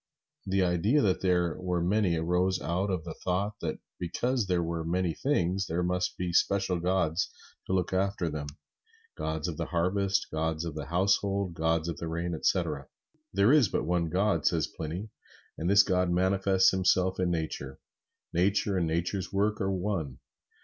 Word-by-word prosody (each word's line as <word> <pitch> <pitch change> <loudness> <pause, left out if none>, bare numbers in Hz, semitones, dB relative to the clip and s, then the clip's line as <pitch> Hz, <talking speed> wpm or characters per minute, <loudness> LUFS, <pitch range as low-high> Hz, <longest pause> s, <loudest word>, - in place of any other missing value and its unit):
The 95 0 +2
idea 90 - +2
that 95 -3 +1
there 90 -3 +2
were 90 -1 0
many 90 0 +2
arose 90 +3 +1
out 90 +4 -1
of 90 -4 -1
the 80 -1 -6
thought 100 +3 -2
that 80 -2 -2 0.2
because 115 +6 -1
there 90 -2 +1
were 85 0 -3
many 85 +1 0
things, 95 - 0
there 85 +2 -1
must 90 +1 -1
be 90 -1 -2
special 95 0 +2
gods 90 -1 +1 0.4
to - - -1
look 90 -1 0
after 95 -1 0
them: 75 -2 -4 0.7
gods 80 0 -3
of 80 -3 -4
the - - -3
harvest, 95 +3 0
gods 80 +1 -1
of 85 - -4
the 75 -2 -6
household, 95 +2 +1
gods 80 0 0
of 85 - -3
the 85 - -5
rain, 85 +1 -2
etc. 80 -4 0 0.4
There 100 +7 +4
is 145 -7 +6
but - - -2
one 85 -1 0
God, 100 +5 +1
says 80 -4 +2
Pliny, 85 +7 -6 0.5
and 85 - -2
this 100 +1 +7
God 90 -2 +1
manifests 95 +1 +3
Himself 95 0 +2
in 90 -1 +1
Nature. 80 -5 -3 0.6
Nature 95 +2 +2
and 85 - 0
Nature's 90 +4 -2
work 105 +2 0
are 95 0 0
one. 90 -8 -2
90 Hz, 170 wpm, -29 LUFS, 85-95 Hz, 0.7 s, this